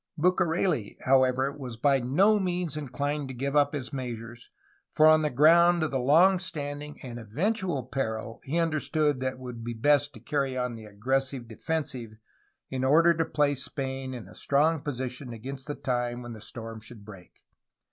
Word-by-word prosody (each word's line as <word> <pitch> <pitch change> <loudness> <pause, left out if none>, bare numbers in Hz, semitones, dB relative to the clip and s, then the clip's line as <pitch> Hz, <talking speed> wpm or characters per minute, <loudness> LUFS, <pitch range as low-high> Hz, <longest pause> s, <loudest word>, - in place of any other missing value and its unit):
Bucareli, 170 - +1
however, 130 +1 +3
was 125 -5 -7
by 135 +2 +3
no 190 - +3
means 180 -4 -2
inclined 145 0 -3
to 130 - -7
give 140 +3 -2
up 145 0 +4
his 140 -1 -5
measures, 120 -3 -6 0.5
for 155 - +6
on 155 0 +7
the 150 - +1
ground 170 +5 +5
of 155 - -1
the 135 - 0
long 170 +9 +5
standing 150 -3 -6
and 120 -2 -7
eventual 165 - -1
peril 115 -3 -4
he 150 +5 -2
understood 155 -3 +1
that 130 0 -1
it - - -15
would 125 -3 -7
be 120 0 -4
best 145 +4 +3
to - - -10
carry 135 +1 -1
on 125 -1 -1
the 110 -1 -9
^^ - - -11
aggressive 130 +4 -1
defensive" 125 -2 -4 0.6
in 130 -1 -2
order 165 +6 +5
to 165 0 0
place 145 -4 +1
Spain 130 -1 -4
in 120 - -8
a - - -14
strong 150 +2 +2
position 130 -2 -5
against 130 +4 -8
the 145 - -3
time 120 -1 -2
when 120 -1 -7
the 110 - -10
storm 115 -1 -8
should 110 -2 -13
break. 95 -5 -14
135 Hz, 180 wpm, -28 LUFS, 120-150 Hz, 0.6 s, on